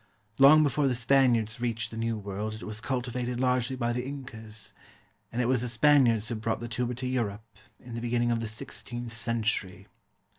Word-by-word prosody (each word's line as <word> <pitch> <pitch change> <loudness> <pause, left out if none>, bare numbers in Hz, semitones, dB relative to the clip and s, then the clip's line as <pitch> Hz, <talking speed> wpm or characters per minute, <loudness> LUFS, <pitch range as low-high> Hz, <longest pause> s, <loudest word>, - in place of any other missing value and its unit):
Long 150 +3 +8
before 145 0 +2
the 130 - +1
Spaniards 120 -2 +2
reached 115 -2 -2
the - - -7
New 115 0 -1
World 105 +1 -4
it 110 - -9
was 110 0 -6
cultivated 125 -1 -2
largely 125 0 +1
by 120 -2 -1
the 125 - -1
Incas; 115 -6 -7 0.6
and 125 +2 0
it - - 0
was 125 -2 +2
the 125 - -2
Spaniards 120 -3 +4
who - - -2
brought 110 0 -2
the 120 - -5
tuber 120 +1 -2
to 130 +1 -3
Europe, 115 -4 -2 0.3
in 120 -1 -11
the 115 - -4
beginning 120 0 +1
of 115 - +1
the 115 - -3
sixteenth 120 +2 -5
century. 110 -4 -2
120 Hz, 190 wpm, -28 LUFS, 110-125 Hz, 0.6 s, Long